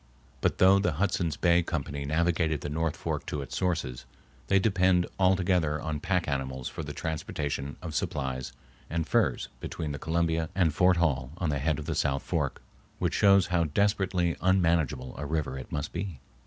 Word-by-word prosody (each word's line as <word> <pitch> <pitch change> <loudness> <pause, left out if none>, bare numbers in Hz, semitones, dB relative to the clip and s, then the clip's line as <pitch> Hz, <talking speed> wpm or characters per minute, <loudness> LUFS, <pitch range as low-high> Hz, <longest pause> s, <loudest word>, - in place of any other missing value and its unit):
But - - +1
though 95 +1 +6
the 95 -5 +1
Hudson's 85 -2 0
Bay 85 0 +4
Company 70 -4 -3
navigated 80 0 +1
the 75 - -4
north 80 +1 -1
fork - - -3
to 75 -2 -3
its 65 - -7
sources, 80 -9 -1 0.4
they 100 - +4
depended 95 -3 +3
altogether 90 -5 +2
on 75 0 -3
pack 90 +1 0
animals 65 -2 -2
for - - -5
the - - -5
transportation 75 -3 -3
of 85 -4 -5
supplies 65 -2 -2 0.4
and 80 0 -2
furs - - +1
between 80 -3 -4
the 70 - -5
Columbia 80 0 0
and 85 -5 +3
Fort 90 +3 +4
Hall 70 -6 0
on 90 - -1
the 70 - -1
head 75 +2 +1
of 75 - -6
the - - -2
south 70 0 0
fork, - - -2 0.3
which - - 0
shows 100 -2 +5
how 85 -1 +3
desperately 95 0 +1
unmanageable 85 -9 +2
a 75 - -3
river 75 -3 -1
it 65 - -8
must 75 -1 -3
be. 85 -5 -4
80 Hz, 180 wpm, -28 LUFS, 70-90 Hz, 0.4 s, though